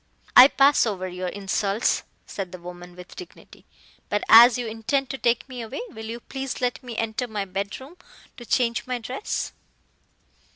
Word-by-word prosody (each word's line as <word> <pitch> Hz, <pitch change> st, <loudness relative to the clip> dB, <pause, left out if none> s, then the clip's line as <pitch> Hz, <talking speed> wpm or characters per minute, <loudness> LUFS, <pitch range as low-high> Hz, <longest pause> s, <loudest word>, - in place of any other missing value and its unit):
"I 255 Hz, -, +11 dB
pass 280 Hz, -3 st, +4 dB
over 190 Hz, -3 st, -3 dB
your 180 Hz, 0 st, -5 dB
insults," 200 Hz, +2 st, -1 dB, 0.2 s
said 190 Hz, -3 st, -6 dB
the 185 Hz, -, -8 dB
woman 175 Hz, 0 st, -11 dB
with 180 Hz, 0 st, -12 dB
dignity. 365 Hz, -, -13 dB, 0.4 s
"But 205 Hz, 0 st, -1 dB
as 235 Hz, +2 st, +9 dB
you 245 Hz, -, -3 dB
intend 230 Hz, +5 st, -2 dB
to 270 Hz, -, -6 dB
take 235 Hz, +2 st, +1 dB
me 255 Hz, -2 st, -7 dB
away, 225 Hz, -, -6 dB
will 220 Hz, -, -9 dB
you 230 Hz, +1 st, -6 dB
please 270 Hz, +1 st, -5 dB
let 250 Hz, +1 st, -1 dB
me 240 Hz, -3 st, -8 dB
enter 225 Hz, +3 st, -2 dB
my 210 Hz, -3 st, -4 dB
bedroom 200 Hz, -, -6 dB, 0.4 s
to 240 Hz, -, -10 dB
change 235 Hz, 0 st, 0 dB
my 250 Hz, -1 st, -2 dB
dress?" 250 Hz, -, -4 dB
225 Hz, 170 wpm, -24 LUFS, 195-250 Hz, 0.4 s, I